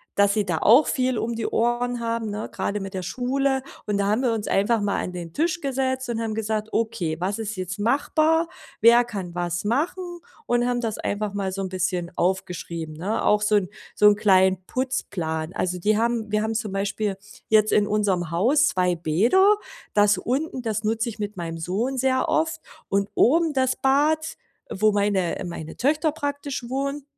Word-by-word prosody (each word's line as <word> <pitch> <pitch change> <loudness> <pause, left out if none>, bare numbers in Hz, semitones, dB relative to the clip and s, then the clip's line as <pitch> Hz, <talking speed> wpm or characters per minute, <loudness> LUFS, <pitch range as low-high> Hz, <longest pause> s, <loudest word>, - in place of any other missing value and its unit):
dass 200 0 +4
sie 210 -1 0
da 175 -4 -1
auch 240 - +6
viel 255 -2 0
um 230 +2 -2
die 230 - -3
Ohren 240 +1 0
haben, 230 -1 -2
ne, 210 +1 -5
grade 205 0 -2
mit 195 0 -6
der 185 -1 -4
Schule. 265 +3 0 0.2
Und 205 -1 -1
da 200 - +1
haben 215 +5 +1
wir 245 -3 +1
uns 220 -2 -3
einfach 210 +3 +2
mal 200 -1 0
an 180 - -5
den 170 -2 -6
Tisch 340 - -1
gesetzt 260 -2 -1
und 230 - -2
haben 225 -1 -2
gesagt: 215 -1 -2
„Okay, 180 -8 -1
was 195 +4 -1
ist 220 -1 -4
jetzt 185 +1 -5
machbar? 310 +8 +2 0.3
Wer 235 +1 +7
kann 195 -7 -6
was 175 0 -2
machen?“ 345 - -2 0.3
Und 240 0 +1
haben 245 0 0
das 225 -2 -2
einfach 205 0 -3
mal 195 -2 -2
so 195 - -3
'n 190 - -3
bisschen 180 -1 -2
aufgeschrieben, 175 -3 -2
ne? 190 +8 -2
Auch 210 0 +3
so 210 0 +2
'n 190 -3 +1 0.3
so 210 - +6
'n 210 - +6
kleinen 190 -2 +4
Putzplan. 175 - -3
Also, 180 -1 -2
die 210 +4 +2
haben 230 -1 0
wir 210 - +3
haben 225 0 -2
zum 215 -3 -3
Beispiel 200 0 -1 0.3
jetzt 215 -1 +4
in 205 -1 +3
unserem 195 -5 0
Haus 250 - +3
2 180 -1 +1
Bäder. 225 - +4 0.4
Das 205 -1 +4
unten, 260 +6 -2
das 220 -2 -2
nutze 225 +2 0
ich 225 -2 -6
mit 205 -2 -4
meinem 165 -1 -4
Sohn 215 +11 -2
sehr 260 0 +1
oft. 320 +1 0 0.3
Und 200 +1 0
oben 325 +4 +3
das 260 -1 +1
Bad, 310 +4 +2 0.3
wo 215 +2 +2
meine 200 -4 0
meine 160 -2 -7
Töchter 305 +4 +1
praktisch 285 -3 -4
wohnen 275 +2 -2
215 Hz, 190 wpm, -24 LUFS, 195-255 Hz, 0.4 s, Wer